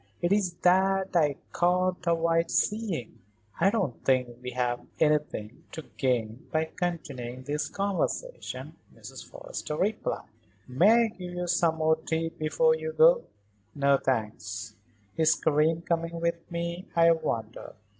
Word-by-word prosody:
It's 185 0 +1
that 190 +1 +3
I 150 -4 +3 0.2
can't 180 0 +1
avoid 165 0 +2
seeing." 205 - -1 0.4
"I 190 - +5
don't 195 - -2
think 125 -2 +1
we 125 - -5
have 125 -1 -1 0.2
anything 150 -7 0
to 160 - -6
gain 120 -2 -1
by 160 0 0
continuing 130 -8 -4
this 150 +3 -2
conversation," 200 - -3 0.2
Mrs. - - -10
Forrester - - -6
replied. 210 +5 -1 0.4
"May 200 - +5
I - - 0
give 180 -4 -8
you 180 0 -2
some 170 -2 +2
more 160 0 +2
tea 160 +1 -2
before 475 - +2
you 475 0 -4
go?" - - +5 0.5
"No, 140 -1 +4
thanks. 105 -3 -3 0.4
Is 160 0 +4
Karen 160 +2 +2
coming 170 0 -1
with 170 0 -2
me, 170 +1 -4
I 170 0 +6
wonder? 120 -9 -3
165 Hz, 135 wpm, -28 LUFS, 140-185 Hz, 0.5 s, I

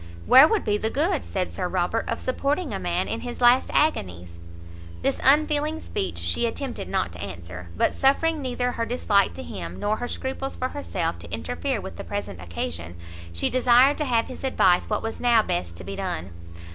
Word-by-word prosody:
"Where 265 +4 +9
would 435 +3 0
be 210 0 +1
the 220 - -1
good," 315 - 0
said 185 -2 -3
Sir 180 - -2
Robert, 185 +5 -1
"of 230 - -1
supporting 280 +6 -1
a - - -2
man - - -1
in - - -3
his 245 -1 -6
last 245 +1 +5
agonies?" 90 - 0 0.6
This - - 0
unfeeling 300 +2 +3
speech 90 - -4
she 85 - 0
attempted 245 - -5
not 90 -2 0
to 90 0 -9
answer, 90 -2 -8
but, - - +2
suffering 310 +3 +2
neither 250 -1 -1
her 230 -1 -2
dislike 205 - +2
to 90 - -6
him, 85 +1 -7
nor 210 +1 0
her 245 - -4
scruples 265 +2 -4
for 255 - -2
herself, 285 - -3
to - - -10
interfere 270 -5 -2
with 190 - -8
the - - -6
present 205 - -5
occasion, 85 -1 -5 0.4
she 85 - -1
desired 255 +3 +5
to 300 - 0
have 235 -4 +2
his - - -9
advice 185 -9 +3
what 210 - -1
was 225 0 -4
now 235 -3 +4
best 85 - -3
to 90 - -8
be 100 +2 -6
done. 90 +1 -4
225 Hz, 195 wpm, -25 LUFS, -, 0.6 s, Where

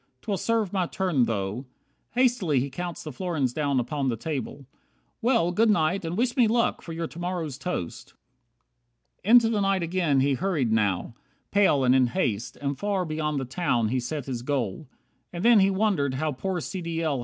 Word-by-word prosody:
'Twill 205 - -1
serve 220 0 0
my 185 -3 +1
turn 170 -11 +1
though 110 +4 -3 0.2
" - - -45
Hastily 240 - +2
he 135 +2 -3
counts 175 +3 -5
The 155 - -6
florins 145 -5 -2
down 140 -3 0
upon 135 +2 -1
the 120 - 0
table. 140 0 -5 0.6
"Well, 230 -8 +2
Good 220 +5 +3
night, 180 -1 +2
and 165 +2 -3
wish 245 +1 +1
me 245 -4 +4
luck 230 +2 +1
for 170 - -9
your 165 +1 -3
to 165 - -9
morrow's 175 -6 -3
toast." 135 - -5 1.0
64 205 - -7
Into 235 -2 +7
the 215 -3 0
night 195 -2 +1
again 170 -5 +1
he 140 +1 +2
hurried, 150 -7 0
now 105 0 0 0.4
Pale 195 -9 +4
and 125 0 +4
in 130 -1 +4
haste; 120 - -2
and 140 -1 -3
far 200 -3 0
beyond 155 -2 -2
the 135 - -3
town 120 -5 0
He 130 +2 0
set 135 +3 -4
his 125 -3 -4
goal. 130 -1 -2 0.4
And 175 +3 -4
then 235 -2 +7
he 195 0 +4
wondered 190 -9 +1
how 155 +3 -1
Poor 180 +7 -3
C. 185 - -5
D. 165 -1 -3
L. 145 -5 0
160 Hz, 200 wpm, -26 LUFS, 130-190 Hz, 1.0 s, Into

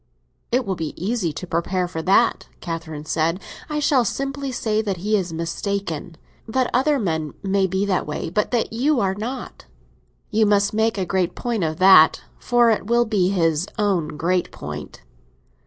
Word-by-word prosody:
"It 250 +1 +1
will 195 - -1
be 160 -3 -5
easy 195 -2 -1
to 160 - -7
be - - -24
prepared 180 +1 -1
for 160 - -3
that," 185 +4 +2
Catherine 165 -3 -6
said. 165 +3 0 0.3
"I 300 - -2
shall 285 -4 +3
simply 275 +4 -3
say 220 -3 0
that 200 -4 -2
he 210 +5 0
is 185 -4 -1
mistaken—that 190 - -4
other 285 +4 +3
men 160 - -2
may 195 0 +2
be 190 +2 0
that 190 -6 0
way, 150 +2 -4
but 210 +3 0
that 235 -2 -1
you 270 +4 +2
are 190 -3 +1
not." 230 - -6 0.6
"You 215 0 +3
must 205 0 +2
make 220 0 +1
a 190 - -1
great 185 -1 -1
point 235 -6 -2
of 160 -1 -1
that, 185 -4 +6 0.2
for 240 -1 +3
it 210 -2 -1
will 240 +1 +3
be 200 -5 +1
his 165 -2 +1
own 180 -8 0
great 180 +3 0
point." - - -8
195 Hz, 175 wpm, -22 LUFS, 170-225 Hz, 0.6 s, that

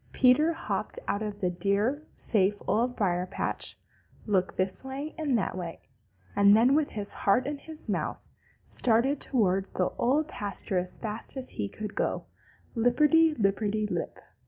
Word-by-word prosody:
Peter 275 +6 +5
hopped - - -3
out 200 - 0
from 210 -2 -4
the 180 -3 0
dear, 200 +10 +1
safe 205 -1 +1
Old 245 +3 +1
Briar 180 -4 0
patch, - - -2 0.5
looked 190 -4 0
this 185 +4 0
way 275 +3 -5
and 295 -6 +1
that 195 - -1
way, 175 -3 -5 0.6
and 200 +1 +7
then, 245 +4 +5
with 300 0 +1
his 205 -2 -4
heart 205 +6 +2
in 285 0 -3
his 315 +1 -7
mouth, - - -2 0.4
started 255 +4 +1
towards 195 -6 +1
the 180 - +1
Old 290 +5 +2
Pasture 200 - -2
as 180 0 -5
fast 220 +4 -5
as 260 -1 -6
he 100 -1 -3
could 210 -1 -6
go, - - -1 0.5
lipperty 300 +7 +4
lipperty 210 0 +1
lip. - - -3
215 Hz, 160 wpm, -28 LUFS, 195-265 Hz, 0.6 s, and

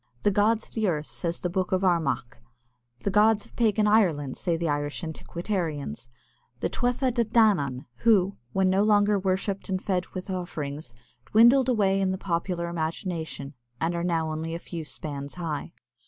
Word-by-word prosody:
"The 205 - +4
gods 215 +3 +2
of - - -21
the 220 -2 0
earth," 155 -4 0
says 170 +1 -4
the 180 - -1
Book 185 0 -1
of 185 0 +1
Armagh. 160 -10 0 0.7
"The 200 - 0
gods 210 +1 +4
of - - -18
pagan 215 -2 +2
Ireland," 170 -11 +3
say 170 -3 0
the 170 0 -1
Irish 145 +3 -2
antiquarians, 160 - -4 0.5
"the - - -1
Tuatha 245 +1 0
De 235 -1 +1
Danān, 200 - +2
who, 200 - +3 0.2
when 190 +5 +2
no 190 +1 +3
longer 205 -1 +4
worshipped 190 +1 -1
and 190 -1 0
fed 185 -2 -1
with 185 +1 -5
offerings, 150 -7 -5 0.3
dwindled 240 +4 +6
away 195 -5 +2
in 190 - +2
the 190 - -1
popular 170 -1 -2
imagination, 160 -3 -4 0.3
and 165 +2 0
now 165 -2 0
are - - -3
only 160 +1 -3
a - - -2
few 170 -1 -6
spans 145 -2 -6
high." 165 -4 -4
185 Hz, 170 wpm, -27 LUFS, 160-205 Hz, 0.7 s, dwindled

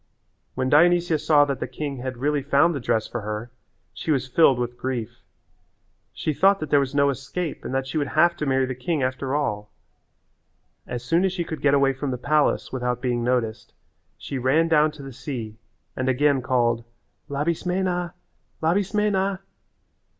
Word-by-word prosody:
When 130 0 -1
Dionysia 170 +2 +4
saw 145 -2 +4
that 140 -2 -3
the - - -3
king 140 +2 -5
had 130 0 -5
really 145 +3 0
found 145 +5 +3
the 140 - -3
dress 110 -3 0
for 120 - -5
her 105 +3 -5 0.4
she - - -7
was 135 -4 +1
filled 135 -1 +4
with 120 0 -3
grief. 120 -3 -4 0.9
She 155 - -2
thought 195 +6 +4
that 155 - -5
there 145 - +6
was 140 0 -2
no 140 0 +4
escape 140 +5 -5
and - - -5
that 135 0 0
she 135 +4 -2
would 145 - -1
have 170 +4 +3
to 150 - -3
marry 135 0 +2
the 130 - -3
king 135 +3 -2
after 130 +2 -2
all. 105 -8 -2 1.2
As 120 -1 -5
soon 165 +7 +2
as 190 -1 +1
she 180 -2 -2
could 160 -2 -6
get 140 -1 +4
away 135 -1 +3
from 135 +1 -4
the 125 - -2
palace 150 +4 +1
without 125 -1 -1
being 120 -1 -1
noticed 120 -3 -2 0.4
she 135 - -5
ran 140 +6 +3
down 155 -1 +4
to 150 -2 -11
the 135 -1 -8
sea 115 -5 -6 0.4
and 130 0 -1
again 140 +1 +2
called, 120 -2 +1 0.5
"Labismena, 175 +4 -1 0.4
Labismena." 195 +2 +1
140 Hz, 180 wpm, -24 LUFS, 125-160 Hz, 1.2 s, there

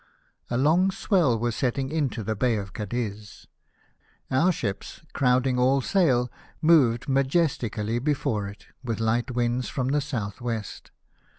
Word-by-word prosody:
A 120 - -1
long 165 +8 +3
swell 180 - +2
was 120 0 -1
setting 130 +1 -1
into 140 -8 -1
the 110 +1 -2
Bay 120 +2 +1
of 100 -2 -6
Cadiz; 105 -1 -5 0.9
our 165 +8 +4
ships, 100 - -5
crowding 125 -1 +2
all 130 +2 +3
sail, 130 -6 +2 0.3
moved 140 -8 +4
majestically 130 -6 0
before 120 -7 -1
it, 100 +1 -11 0.2
with 115 -3 -3
light 115 +3 0
winds 120 0 -1
from 130 -1 -2
the 145 +1 +1
south 115 -9 -4
Avest. 115 -4 -5
125 Hz, 135 wpm, -26 LUFS, 115-140 Hz, 0.9 s, our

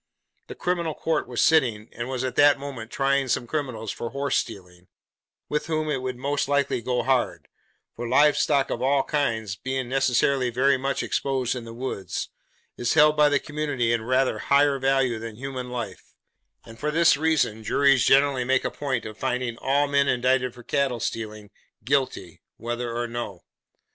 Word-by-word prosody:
The - - -8
criminal 170 -3 -1
court 160 - -1
was 125 -1 -2
sitting, 120 -9 +3
and 120 +2 -6
was 130 -1 -3
at 130 -2 -3
that 145 0 +6
moment 135 -5 -7
trying 135 +1 +1
some 125 - 0
criminals 125 -7 -3
for 115 - -5
horse 140 +1 -2
stealing: 90 -5 -5 0.6
with 150 +1 -2
whom 155 -1 -1
it 135 -3 -1
would 130 -1 -4
most 140 +2 -1
likely 140 -3 +1
go 125 +1 -1
hard: 130 -2 0 0.5
for 120 +1 -5
live 145 +4 +5
stock 140 -2 +1
of 120 - -3
all 135 +1 +2
kinds 115 -9 -1
being 130 +3 -3
necessarily 130 0 +2
very 135 +4 +3
much 135 +1 -2
exposed 130 -3 -1
in 120 -2 -6
the 115 - -9
woods, 120 -6 -4 0.5
is 120 0 0
held 150 0 +6
by 150 -1 +5
the 145 - +3
community 145 -5 -1
in 115 - 0
rather 130 +3 +1
higher 140 0 +3
value 135 -3 +1
than 115 -1 -7
human 130 0 -6
life; 125 -2 -7 0.5
and 115 0 -13
for 150 - -1
this 165 +2 +4
reason, 145 -8 0
juries 135 +2 +3
generally 135 -1 +4
make 130 +2 +1
a - - -1
point 135 -5 -3
of 110 -1 -8
finding 125 -1 -2
all 140 +2 +1
men 140 0 +2
indicted 125 0 +1
for 120 - -12
cattle 140 -4 0
stealing, 110 -2 -5 0.3
guilty, 130 - -1 0.2
whether 120 0 -4
or 120 0 -1
no. 115 -7 -6
130 Hz, 180 wpm, -25 LUFS, 120-140 Hz, 0.6 s, that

